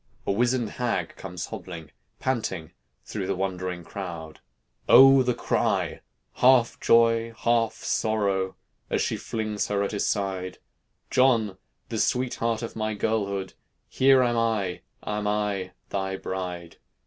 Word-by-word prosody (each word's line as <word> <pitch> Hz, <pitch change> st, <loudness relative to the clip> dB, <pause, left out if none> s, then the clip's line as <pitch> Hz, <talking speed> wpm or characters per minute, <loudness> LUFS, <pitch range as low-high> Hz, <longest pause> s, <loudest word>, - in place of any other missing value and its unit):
a -, -, +1 dB
wizened 120 Hz, +3 st, +1 dB
hag 120 Hz, -2 st, -2 dB
comes -, -, -6 dB
hobbling, 85 Hz, -3 st, -8 dB, 0.3 s
Panting, 105 Hz, -11 st, -2 dB, 0.3 s
through 100 Hz, -4 st, -4 dB
the -, -, 0 dB
wondering 90 Hz, -2 st, -3 dB
crowd. 85 Hz, -6 st, -7 dB, 0.5 s
O! 135 Hz, +1 st, +9 dB
the 125 Hz, -1 st, +1 dB
cry, -, -, 0 dB, 0.4 s
half 125 Hz, -2 st, +4 dB
joy, 115 Hz, 0 st, +4 dB
half 115 Hz, -1 st, +2 dB
sorrow, 100 Hz, -4 st, 0 dB, 0.3 s
As -, -, +1 dB
she -, -, 0 dB
flings 110 Hz, -2 st, -3 dB
her 100 Hz, -1 st, 0 dB
at 100 Hz, -, -2 dB
his 105 Hz, -, -1 dB
side: 95 Hz, -3 st, -2 dB, 0.5 s
"John! 115 Hz, -7 st, +3 dB, 0.3 s
the 110 Hz, -, -2 dB
sweetheart 115 Hz, -2 st, 0 dB
of 115 Hz, -, -6 dB
my 110 Hz, -1 st, -2 dB
girlhood, 100 Hz, -3 st, -1 dB, 0.4 s
Here 135 Hz, 0 st, +5 dB
am 120 Hz, -1 st, +1 dB
I, 105 Hz, -6 st, 0 dB, 0.2 s
am 105 Hz, 0 st, -2 dB
I, 105 Hz, -3 st, -1 dB, 0.2 s
thy 95 Hz, -1 st, -2 dB
bride. 90 Hz, -3 st, -5 dB
105 Hz, 130 wpm, -26 LUFS, 95-115 Hz, 0.5 s, O